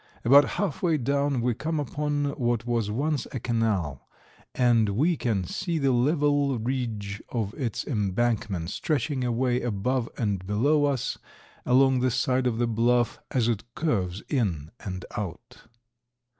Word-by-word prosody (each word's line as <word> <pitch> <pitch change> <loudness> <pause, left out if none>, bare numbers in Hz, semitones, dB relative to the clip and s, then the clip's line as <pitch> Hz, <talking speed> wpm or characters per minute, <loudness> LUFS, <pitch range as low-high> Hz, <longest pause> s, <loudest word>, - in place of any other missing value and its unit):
About 140 +4 +8
half 195 -8 -1
way 165 -4 +2
down 140 0 0
we 120 0 +1
come 155 +6 -2
upon 145 +1 -1
what 120 -2 0
was 115 -3 0
once 140 +4 -1
a 130 - -3
canal, 105 - -1 0.5
and 120 -4 +3
we 150 - +2
can 110 -9 -1
see 165 - -2
the 140 -3 +2
level 145 +1 +2
ridge 110 -4 -3
of 110 -4 -2
its 125 -7 -3
embankment 105 - -1
stretching 145 -3 -1
away 125 +1 +1
above 120 +2 -1
and 100 -5 -1
below 145 +9 +3
us 140 -4 -1 0.5
along 130 +1 +4
the 130 +1 +2
side 125 +1 +1
of 115 -2 -1
the 120 - +2
bluff, 120 +1 +1
as 120 -3 +1
it 115 -2 0
curves 100 - -1
in 90 - -1
and 95 -2 -6
out. 90 -5 -7
120 Hz, 145 wpm, -26 LUFS, 110-140 Hz, 0.5 s, About